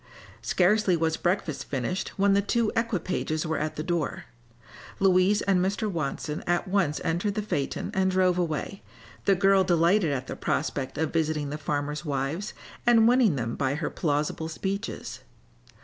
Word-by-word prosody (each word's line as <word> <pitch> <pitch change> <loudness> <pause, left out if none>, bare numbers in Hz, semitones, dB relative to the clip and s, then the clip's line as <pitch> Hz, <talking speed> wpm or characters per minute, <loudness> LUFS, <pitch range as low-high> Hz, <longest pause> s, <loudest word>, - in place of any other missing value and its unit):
Scarcely 185 0 +3
was 160 0 +1
breakfast 165 -7 -1
finished 135 +7 -2
when 200 0 +4
the 200 - +4
two 220 +2 +1
equipages 185 -8 -1
were 160 0 -1
at 155 +1 -2
the 155 - -3
door. 170 -2 -2 0.7
Louise 195 +2 +4
and 185 -2 +2
Mr. 200 +3 -1
Watson 155 -4 -3
at 175 +2 +1
once 185 -6 +1
entered 180 +5 -1
the 215 - -1
phaeton 145 -2 -2
and 190 -2 +2
drove 185 -1 +2
away, 175 +3 -2 0.4
the 195 - +4
girl 195 +1 +4
delighted 175 0 +3
at 130 -2 -2
the - - -6
prospect 135 -3 -2
of 160 0 -1
visiting 155 -3 0
the 150 - -3
farmers' 150 +1 -2
wives 150 - -3 0.3
and 230 -2 +5
winning 240 - +4
them 115 -3 -2
by 140 -1 0
her 150 0 -3
plausible 150 +1 -1
speeches. 195 +6 -4
175 Hz, 160 wpm, -27 LUFS, 150-195 Hz, 0.7 s, and